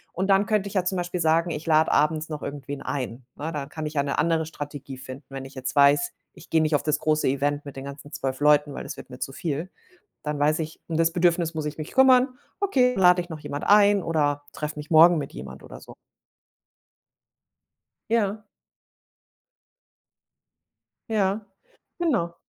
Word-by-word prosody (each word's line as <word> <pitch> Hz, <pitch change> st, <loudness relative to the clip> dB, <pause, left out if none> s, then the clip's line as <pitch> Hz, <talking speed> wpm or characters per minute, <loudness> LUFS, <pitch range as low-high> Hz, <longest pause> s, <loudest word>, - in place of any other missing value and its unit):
Und 190 Hz, +2 st, -1 dB
dann 195 Hz, +1 st, +4 dB
könnte 210 Hz, -2 st, 0 dB
ich 200 Hz, -, -9 dB
ja 185 Hz, -2 st, +1 dB
zum 190 Hz, -, -1 dB
Beispiel 175 Hz, 0 st, -3 dB
sagen, 165 Hz, +1 st, +2 dB
ich 155 Hz, -1 st, -5 dB
lade 160 Hz, -1 st, +3 dB
abends 155 Hz, +1 st, +1 dB
noch 150 Hz, -2 st, -5 dB
irgendwen 140 Hz, 0 st, -6 dB
ein. 125 Hz, -3 st, -4 dB
Ne, 155 Hz, +3 st, -4 dB
dann 145 Hz, -3 st, -4 dB
kann 155 Hz, +1 st, -6 dB
ich 150 Hz, -, -7 dB
ja 140 Hz, -, +3 dB
'ne 140 Hz, -1 st, -2 dB
andere 165 Hz, -1 st, +2 dB
Strategie 145 Hz, -3 st, -7 dB
finden. 130 Hz, +1 st, -10 dB
Wenn 135 Hz, -1 st, -6 dB
ich 135 Hz, -, -12 dB
jetzt 130 Hz, +1 st, -5 dB
weiß, 145 Hz, +4 st, +4 dB, 0.2 s
ich 175 Hz, -1 st, -16 dB
gehe 160 Hz, -, +4 dB
nicht 155 Hz, -1 st, +2 dB
auf 145 Hz, -, 0 dB
das 150 Hz, -, 0 dB
große 155 Hz, 0 st, +1 dB
Event 145 Hz, +2 st, 0 dB
mit 140 Hz, -, -9 dB
den 135 Hz, 0 st, -7 dB
ganzen 140 Hz, +1 st, -9 dB
12 135 Hz, -3 st, -3 dB
Leuten, 150 Hz, 0 st, +4 dB
weil -, -, -5 dB
das -, -, -7 dB
wird -, -, -11 dB
mir 125 Hz, -, -10 dB
zu -, -, -4 dB
viel, 160 Hz, +4 st, -4 dB, 0.5 s
dann 150 Hz, -1 st, -3 dB
weiß 150 Hz, +2 st, +2 dB
ich, 160 Hz, 0 st, -5 dB
um 160 Hz, -, -2 dB
das 165 Hz, 0 st, +3 dB
Bedürfnis 170 Hz, -1 st, +2 dB
muss 155 Hz, -1 st, -3 dB
ich 150 Hz, 0 st, -4 dB
mich 155 Hz, -, -6 dB
kümmern. 260 Hz, -1 st, +5 dB, 0.2 s
Okay, 265 Hz, -11 st, +3 dB
dann 190 Hz, -, -2 dB
lade 180 Hz, 0 st, +6 dB
ich 175 Hz, -, -10 dB
noch 160 Hz, -2 st, -6 dB
jemand 145 Hz, -1 st, -5 dB
ein 205 Hz, -1 st, +5 dB
oder 145 Hz, -3 st, 0 dB
treffe 150 Hz, 0 st, -5 dB
mich 150 Hz, +2 st, -8 dB
morgen 165 Hz, +2 st, +7 dB
mit 140 Hz, -3 st, -5 dB
jemand 65 Hz, +1 st, -9 dB
oder -, -, -11 dB
so. -, -, -13 dB, 2.2 s
Ja. 215 Hz, -2 st, +1 dB, 2.7 s
Ja. 205 Hz, -1 st, +1 dB, 0.6 s
Genau. 240 Hz, -, 0 dB
155 Hz, 195 wpm, -25 LUFS, 145-180 Hz, 2.7 s, morgen